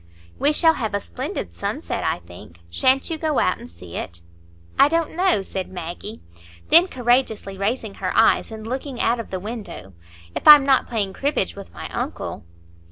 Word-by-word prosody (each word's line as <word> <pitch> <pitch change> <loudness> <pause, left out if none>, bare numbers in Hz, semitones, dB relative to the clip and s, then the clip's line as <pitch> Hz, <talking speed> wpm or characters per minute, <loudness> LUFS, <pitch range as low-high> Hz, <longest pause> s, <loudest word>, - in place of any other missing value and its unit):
"We 290 - +3
shall 325 +1 +4
have 220 -8 -3
a - - +1
splendid 85 - -5
sunset, 85 - -3
I - - 0
think; 85 -1 -14
sha'n't 265 - +2
you 320 - -3
go 310 -3 0
out 185 - +2
and - - -11
see 85 +1 -10
it?" 85 -1 -6 0.6
"I 285 - +7
don't 330 0 -1
know," 360 - +2
said 190 0 -5
Maggie. 180 +4 -7 0.5
Then 340 +3 +7
courageously 240 - 0
raising 220 +1 -2
her 185 -1 -1
eyes 225 - +4
and 220 -1 -8
looking 260 +1 -5
out 235 +1 +1
of 230 - -6
the 185 - -4
window, 205 - -8 0.4
"if - - -3
I'm 295 -2 +10
not 270 -2 +3
playing 205 -5 -2
cribbage 275 -8 -1
with 200 -1 -10
my - - -7
uncle." - - -5
220 Hz, 180 wpm, -22 LUFS, 185-270 Hz, 0.6 s, I'm